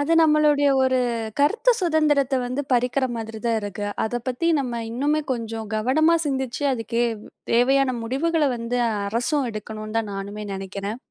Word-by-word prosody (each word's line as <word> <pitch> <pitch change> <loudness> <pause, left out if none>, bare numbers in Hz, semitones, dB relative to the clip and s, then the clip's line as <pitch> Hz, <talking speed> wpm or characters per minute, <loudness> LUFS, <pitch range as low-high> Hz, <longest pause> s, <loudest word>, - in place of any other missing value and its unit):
அது 285 +3 +1
நம்மளுடைய 300 -2 +4
ஒரு 260 0 +2 0.4
கருத்து 460 +12 +4
சுதந்திரத்த 300 -6 +2
வந்து 255 +4 -2
பறிக்கிற 250 +2 +2
மாதிரி 225 -1 -6
தான் 230 -1 +2
இருக்கு. 205 0 -5 0.2
அத 240 +2 -2
பத்தி 255 +6 -1
நம்ம 240 -3 -3
இன்னுமே 290 +6 0
கொஞ்சம் 225 -2 -5
கவனமா 310 +9 +3
சிந்திச்சு, 265 -1 -2
அதுக்கு 230 -1 -1 0.5
தேவையான 255 +2 +3
முடிவுகள 300 +7 0
வந்து 235 +1 -2 0.3
அரசும் 245 +5 0
எடுக்கணும்ன்னு 215 0 -6
தான் 215 -2 -3
நானுமே 200 +2 -6
நினைக்கிறேன். 200 +2 -5
250 Hz, 140 wpm, -23 LUFS, 225-285 Hz, 0.5 s, நம்மளுடைய